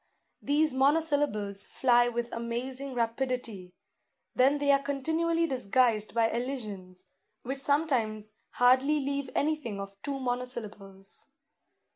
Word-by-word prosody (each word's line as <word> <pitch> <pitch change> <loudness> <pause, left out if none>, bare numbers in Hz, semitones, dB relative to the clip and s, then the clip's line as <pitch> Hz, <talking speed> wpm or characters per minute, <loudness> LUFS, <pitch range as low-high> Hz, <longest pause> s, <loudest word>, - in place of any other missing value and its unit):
These 295 0 +2
monosyllables 275 -8 +1
fly 240 -2 +3
with 240 0 -4
amazing 255 +3 -4
rapidity; 230 -5 -3 0.6
then 270 +3 +3
they 285 0 +2
are 275 0 +4
continually 320 +5 0
disguised 245 -5 +1
by 230 -1 +4
elisions, 210 -8 -5 0.4
which 270 +3 -4
sometimes 240 -8 +1 0.2
hardly 260 +5 +4
leave 280 -1 -3
anything 285 -9 -1
of 195 0 -9
two 275 -1 -4
monosyllables. 220 -6 -5
250 Hz, 105 wpm, -29 LUFS, 220-280 Hz, 0.6 s, are